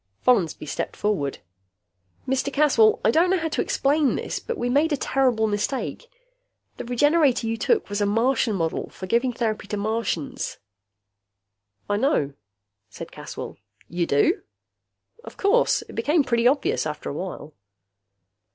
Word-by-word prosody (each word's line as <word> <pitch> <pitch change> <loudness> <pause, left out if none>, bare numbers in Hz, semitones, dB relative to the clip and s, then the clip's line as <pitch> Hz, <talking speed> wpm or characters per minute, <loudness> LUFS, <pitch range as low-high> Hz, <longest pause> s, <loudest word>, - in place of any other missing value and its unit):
Follansby 190 -12 +2
stepped - - -4
forward. 185 -10 -1 0.9
"Mr. 265 +2 0
Caswell, 265 -7 +4
I - - +5
don't 335 +7 +3
know 380 - +3
how 325 -2 -2
to - - -1
explain 285 0 +1
this, - - -3
but 470 - -5
we 245 - -1
made 290 +6 +2
a 290 - +1
terrible 255 -5 +1
mistake. 220 - -2 0.7
The - - -6
Regenerator 280 +1 +3
you 225 0 -1
took 430 - +1
was 205 0 -3
a 205 - +2
Martian 230 +1 +1
model 165 -3 -2
for 185 - -8
giving 235 +6 +1
therapy 220 -3 -2
to 210 - -3
Martians." 215 -7 -2 1.3
"I 205 - 0
know," 205 - +1 0.6
said - - -9
Caswell. - - -8 0.3
"You 170 0 -1
do?" 305 - +2 0.8
"Of - - -11
course. 415 +5 +3
It - - -13
became 300 +1 +2
pretty 235 -2 +2
obvious 270 - +1
after 150 0 -6
a - - -5
while." 155 -2 -6
235 Hz, 150 wpm, -24 LUFS, 205-285 Hz, 1.3 s, I